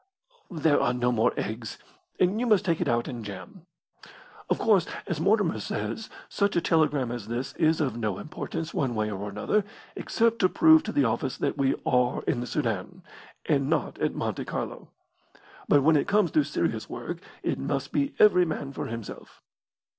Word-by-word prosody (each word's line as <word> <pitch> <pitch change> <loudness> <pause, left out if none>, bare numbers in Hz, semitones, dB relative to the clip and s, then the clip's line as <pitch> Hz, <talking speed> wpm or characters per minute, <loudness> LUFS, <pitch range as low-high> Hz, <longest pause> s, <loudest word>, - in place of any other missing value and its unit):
There 160 -4 +2
are 125 - +1
no 125 0 +1
more 110 -2 +2
eggs, 110 0 -4 0.4
and 185 +4 +2
you 245 - 0
must 210 -3 +3
take 170 -2 +1
it 175 - 0
out 120 -2 +1
in 120 -5 -6
jam. 130 - -10 0.8
Of - - +2
course, 200 -6 +3 0.2
as 165 - -3
Mortimer 195 - +2
says, 105 - -4 0.2
such 200 -1 0
a - - +4
telegram 150 -7 +2
as 120 -4 -6
this 120 +3 -3
is 160 0 +3
of 140 -6 0
no 110 -5 -2
importance 160 +1 -5
one 130 -4 -1
way 110 0 -1
or 100 +1 -4
another, 105 - 0 0.3
except 230 0 +1
to 185 - +4
prove 320 - +6
to 220 - -3
the 145 - +2
office 125 +3 -1
that - - -1
we 135 -1 +1
are 125 -1 +1
in - - 0
the 120 - -4
Soudan, 120 - -3 0.4
and 140 -3 +1
not 160 - -1
at - - 0
Monte - - -2
Carlo. - - -5 0.8
But 145 -2 +4
when 160 +2 +5
it 145 - +2
comes 205 -3 +2
to 305 - +3
serious - - -2
work - - -5 0.2
it - - -1
must - - -2
be 280 0 0
every 195 -4 +6
man 145 -4 -4
for - - -4
himself." 115 -2 -8
145 Hz, 185 wpm, -27 LUFS, 120-185 Hz, 0.8 s, prove